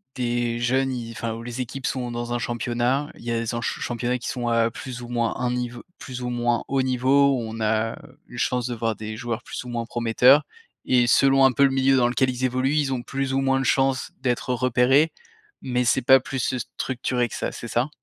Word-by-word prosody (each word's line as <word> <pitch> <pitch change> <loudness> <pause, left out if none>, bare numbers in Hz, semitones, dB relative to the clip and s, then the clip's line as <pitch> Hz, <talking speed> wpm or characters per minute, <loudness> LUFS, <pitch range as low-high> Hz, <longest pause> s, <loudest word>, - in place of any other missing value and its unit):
des 120 -1 -1
jeunes, 130 +2 +1
ils, 120 -2 -5
enfin 115 0 -4
les 120 +1 -6
équipes 130 +2 -6
sont 125 -2 -2
dans 120 0 -4
un 120 - 0
championnat, 120 +4 -1
il - - -14
y 120 - -2
a 115 - 0
des 115 0 -3
en 120 - -2
ch - - -3
championnats 120 +1 -1
qui 120 - -6
sont, 120 -2 -2
heu, 115 0 +3
plus 125 +1 -7
ou 120 - -9
moins 120 -1 0
un 125 0 -1
niveau, 125 -1 -4 0.2
plus 125 -1 -7
ou 125 - -3
moins 120 -1 0
haut 135 -1 +1
niveau, 130 +2 +3
où - - -2
on 115 0 -7
a 110 +1 0 0.3
une - - -11
chance 125 -1 0
de 120 - -3
voir 115 -1 -1
des 110 0 -6
joueurs 120 -1 -4
plus - - -6
ou 125 - -9
moins 120 -1 -3
prometteurs. 120 +5 +4 0.4
Et 125 -1 +3
selon 135 +2 +5
un 135 - +5
peu 140 - +2
le 140 - +6
milieu 135 0 +3
dans 120 -1 +4
lequel 130 +2 +1
ils 130 0 -1
évoluent, 130 +2 0
ils 135 -3 +1
ont 120 - -3
plus 135 +1 -3
ou 135 - +1
moins 135 0 +2
de 135 - -2
chances 135 0 +1
d'être 125 -1 -1
repérés, 130 +5 +3 0.5
mais 125 -1 0
c'est 125 +2 +2
pas 130 +1 +6
plus 130 +1 -2
structuré 125 0 -2
que - - -8
ça, - - -3
c'est 120 - -8
ça? 120 +4 0
125 Hz, 235 wpm, -24 LUFS, 120-130 Hz, 0.5 s, le